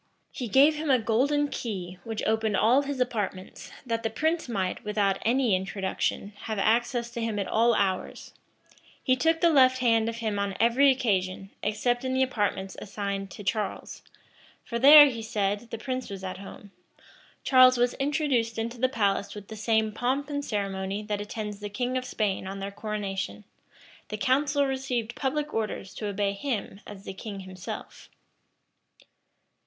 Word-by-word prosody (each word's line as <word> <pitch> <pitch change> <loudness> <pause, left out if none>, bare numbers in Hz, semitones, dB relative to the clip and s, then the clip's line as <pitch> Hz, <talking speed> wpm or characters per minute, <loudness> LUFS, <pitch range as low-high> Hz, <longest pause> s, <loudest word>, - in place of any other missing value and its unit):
He 250 - -5
gave 285 +7 +5
him 310 0 -3
a 260 - +6
golden 270 +6 +1
key, 185 -9 -5
which 225 -2 -4
opened 220 -2 +1
all 245 +6 +4
his 280 -1 -4
apartments, 210 -7 -3 0.2
that 230 -2 -1
the 225 - -1
prince 315 +6 -1
might; 190 -5 -2
without 205 -2 0
any 240 -3 +2
introduction, 190 +1 -2
have 220 -1 -3
access 235 +3 +1
to 235 -1 -5
him 225 -2 -2
at 200 - -2
all 230 +1 +3
hours: 190 -2 -2 0.7
he 255 - +3
took 325 +5 +1
the 340 - +5
left 260 -3 +5
hand 230 -3 +2
of 230 - -4
him 220 -3 -2
on 200 -2 -2
every 240 +5 +5
occasion, 195 -6 0
except 245 +3 0
in 260 0 -1
the 260 - +3
apartments 205 -6 -2
assigned 200 -1 -4
to 205 - -10
Charles; 205 +1 -3 0.6
for 235 - -3
there, 290 +3 +10
he 240 -5 -2
said, 210 0 -2
the 230 - -5
prince 255 +1 -4
was 195 -1 -7
at 185 0 -5
home: 200 0 -11 0.7
Charles 255 -1 +6
was 245 0 +2
introduced 270 -5 0
into 230 +2 -3
the 255 +1 +2
palace 200 -5 0
with 205 -1 -10
the 220 - -7
same 220 0 +1
pomp 265 +6 -1
and 285 0 -2
ceremony 195 -2 -3
that 210 -1 -3
attends 210 -1 -5
the 205 0 -5
kings 250 +4 -1
of 255 - -9
Spain 205 -6 -2
on 195 +1 -5
their 195 +1 -5
coronation: 195 - -4 0.7
the 215 - -4
council 280 +5 +2
received 260 -4 -2
public 295 +3 -2
orders 215 -3 -3
to 210 - -5
obey 200 0 -1
him 205 -3 -4
as 200 -2 -10
the 195 - -6
king 200 0 -7
himself. 185 -1 -8
225 Hz, 170 wpm, -27 LUFS, 200-255 Hz, 0.7 s, there